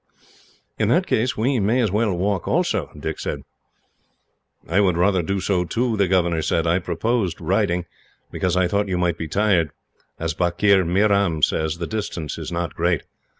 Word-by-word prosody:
"In - - +2
that - - +3
case, 125 +5 0
we 125 +3 +1
may 110 +5 +2
as 110 -6 +1
well 105 +1 +1
walk, 95 -1 -1
also," - - 0
Dick - - -4
said. - - -4 1.2
"I 90 +4 +2
would 90 -4 +2
rather 95 +1 +3
do 95 +4 -2
so, 90 -2 0
too," 115 +6 -1
the 100 -2 +2
governor 85 -3 +1
said. 80 +1 0
"I 85 +2 +2
proposed 100 -1 -1
riding, 90 -3 0 0.5
because 90 0 -1
I 90 -1 +3
thought 100 +3 0
you 90 -2 -1
might 85 -2 0
be 80 - -3
tired. 95 -2 +2 0.5
As 80 -1 -2
Bakir 90 +3 +3
Meeram 100 -3 +2
says, 80 +3 +1
the 85 - -3
distance 95 -8 -4
is - - -6
not 85 0 -3
great. 85 -2 0
90 Hz, 175 wpm, -22 LUFS, 85-105 Hz, 1.2 s, that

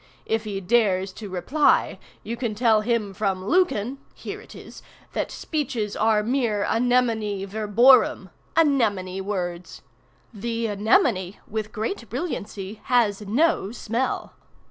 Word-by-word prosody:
If 225 0 -1
he 200 -2 -3
dares 195 -2 +2
to 210 0 -8
reply, 255 - +2 0.2
you 230 - -4
can 235 -3 -3
tell 220 -1 +3
him 215 -3 -1
from 190 -1 -2
Lucan 275 - +1 0.2
(here - - -7
it - - -14
is) - - -11 0.3
that - - -2
speeches 245 -9 -3
are 215 -1 +2
mere 230 -4 0
anemonae 225 -4 +1
verborum, 220 +5 +4 0.3
anemone 210 - +2
words. 180 -3 -4 0.5
The 230 +2 -3
anemone, 210 - +2
with 215 -1 -4
great 225 - -4
brilliancy, 215 - -5
has 225 -5 +2
no 250 - +2
smell. 235 +2 -2
220 Hz, 120 wpm, -24 LUFS, 200-245 Hz, 0.5 s, verborum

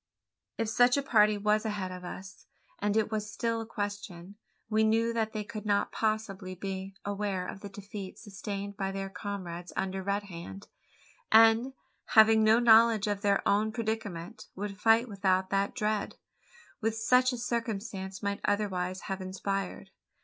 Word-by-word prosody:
If 225 - -1
such 245 +4 +4
a 280 - 0
party 215 -5 +4
was 210 +1 +2
ahead 205 -4 -3
of 180 0 -8
us 190 +1 -9 0.3
and 205 +1 +1
it 220 0 +1
was 210 -1 -3
still 230 +1 -1
a 225 - -7
question 205 -4 -5 0.3
we 220 0 +2
knew 225 +1 +2
that 220 -1 0
they 215 -1 -3
could 215 0 -7
not 205 -1 +1
possibly 210 -4 -2
be 190 +1 -5
aware 200 -2 -2
of 190 - -7
the 200 - -8
defeat 200 -1 -8
sustained 200 -1 -6
by 195 -1 -2
their 195 0 -4
comrades 180 -4 -6
under 190 0 -2
Red 200 +2 -1
Hand; 190 +1 -9 0.6
and, 225 +3 +6 0.4
having 220 0 +7
no 220 +1 +6
knowledge 230 -2 +6
of 205 -1 -2
their 200 -1 +2
own 210 +2 +2
predicament, 220 -3 -4
would 200 0 -5
fight 230 +2 +5
without 190 -2 0
that 200 +4 0
dread, 215 -3 -1 0.6
which 225 -1 -1
such 250 +3 +3
a 250 - -4
circumstance 220 -5 -4
might 200 0 -2
otherwise 190 -3 -1
have 195 -1 -4
inspired. 195 +1 -4
205 Hz, 160 wpm, -30 LUFS, 195-220 Hz, 0.6 s, having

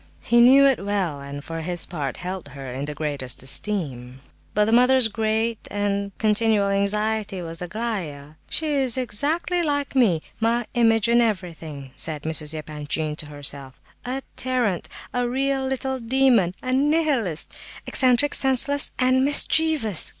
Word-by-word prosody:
He 235 0 +3
knew 270 +3 +7
it 265 -7 +2
well, 195 -8 -2
and 140 0 -8
for 165 +1 -6
his 175 +1 -3
part 145 -7 -5
held 180 -2 -6
her 135 -2 -7
in 135 +2 -4
the 150 0 -6
greatest 140 -5 -4
esteem. 130 - -3 0.3
But 210 0 +3
the 220 - -1
mother's 250 0 +5
great 220 +1 -2
and 200 0 -2
continual 215 -2 +2
anxiety 205 0 -1
was 165 0 -5
Aglaya. 180 -8 -5 0.2
"She 320 - -1
is 270 -5 +2
exactly 295 +9 0
like 285 -3 -2
me—my 230 +2 +1
image 225 -2 +3
in 235 +1 +4
everything," 165 - -4
said 150 +2 -1
Mrs. 160 -1 0
Epanchin 150 0 -3
to 155 - -6
herself. 140 -2 -5 0.2
"A 260 +2 -4
tyrant! 245 -8 -1 0.2
A 245 -1 -1
real 270 +1 -1
little 265 0 -2
demon! 235 -7 +2
A 255 0 -2
Nihilist! 275 - +1 0.3
Eccentric, 255 +2 +3
senseless 270 +2 +3
and 255 0 +3
mischievous! 290 - +3
215 Hz, 145 wpm, -23 LUFS, 160-255 Hz, 0.3 s, knew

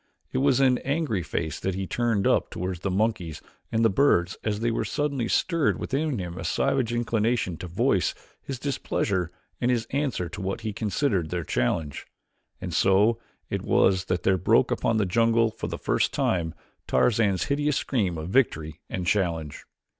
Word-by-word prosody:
It - - 0
was 135 -1 +3
an 130 -2 +4
angry 140 - -1
face 80 -2 -3
that 95 -1 -2
he 95 0 -2
turned 115 -2 0
up - - +2
toward 90 0 -4
the 100 - -1
monkeys 95 -5 -1 0.3
and 115 0 +2
the - - +6
birds 95 -6 +3
as 105 -1 -1
there 115 0 0
suddenly 140 -5 -1
stirred 165 +3 +1
within 145 0 -1
him 90 -2 -5
a - - -5
savage 120 +7 +1
inclination 115 -4 0
to 90 - -7
voice 85 - +1 0.3
his 135 - -5
displeasure 100 - -1 0.3
and 120 - +2
his 120 -2 +1
answer 135 -10 -1
to 85 - -7
what 95 +4 -3
he 110 -2 -3
considered 100 - 0
their 90 -1 -2
challenge. 70 +3 -1 0.5
And - - -5
so 105 +4 +3 0.3
it - - -1
was 95 -1 +3
that 90 -1 -1
there 95 -1 +3
broke - - +3
upon 115 - +1
this 105 -3 +1
jungle 115 +3 +3
for - - -5
the - - -4
first - - +1
time 80 -3 0 0.3
Tarzan's 105 -5 +2
hideous 145 0 0
scream 100 -10 0
of 80 +2 -5
victory 80 - +1
and 90 - -3
challenge. 85 -6 -1
105 Hz, 175 wpm, -26 LUFS, 90-120 Hz, 0.5 s, the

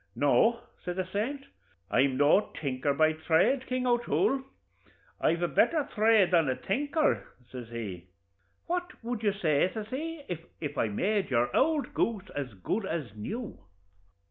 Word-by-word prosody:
'No,' 225 +11 +3 0.2
says 180 0 -3
the 185 0 -1
saint; 230 +9 -3 0.5
'I'm 130 0 +3
no 145 +9 +4
tinker 140 -1 -1
by 155 +2 +3
thrade, 160 - +2
King 255 0 -1
O'Toole; 245 +2 +1 0.8
I've 170 +1 +1
a - - +3
betther 275 - +2
thrade 215 -3 +4
than 165 -6 +4
a 130 - +1
tinker,' 290 - 0 0.2
says 125 -3 -8
he 100 -7 -6 0.6
'what 355 -4 -4
would 235 -1 -3
you 210 -2 +2
say,' 170 -4 +2
says 215 +2 -6
he, 310 +4 -4 0.4
'if 145 -2 -4
I 115 - +1
made 195 - 0
your 120 -2 +1
ould 295 -2 +2
goose 220 -5 -1
as 135 -7 -4
good 190 - -2
as 155 - -4
new?' 215 - -5
190 Hz, 150 wpm, -29 LUFS, -, 0.8 s, no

